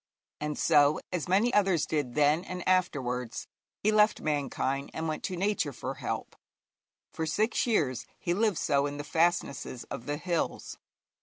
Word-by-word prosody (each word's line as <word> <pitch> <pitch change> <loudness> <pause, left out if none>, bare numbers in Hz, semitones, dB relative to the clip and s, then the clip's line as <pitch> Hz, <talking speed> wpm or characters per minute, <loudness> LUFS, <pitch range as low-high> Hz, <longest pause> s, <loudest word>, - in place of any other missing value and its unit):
And 150 0 -3
so, 150 -1 +4
as 175 -4 -2
many 205 +7 +3
others 190 -6 +3
did 145 -6 -2
then 150 +3 +3
and 180 -1 -6
afterwards, 130 -10 0 0.3
he 215 - +1
left 215 0 +4
mankind 140 -2 -1
and 160 0 -2
went 155 - -2
to 180 - -3
Nature 190 -6 0
for 115 - -4
help. - - -4 0.8
For 160 - -3
six 215 +10 +1
years 145 - +1
he 175 - -1
lived 210 -1 +1
so 140 0 +2
in 145 0 -5
the 145 - -4
fastnesses 155 -6 0
of 115 - -6
the 145 0 -1
hills. 170 +1 -2
160 Hz, 160 wpm, -29 LUFS, 145-185 Hz, 0.8 s, so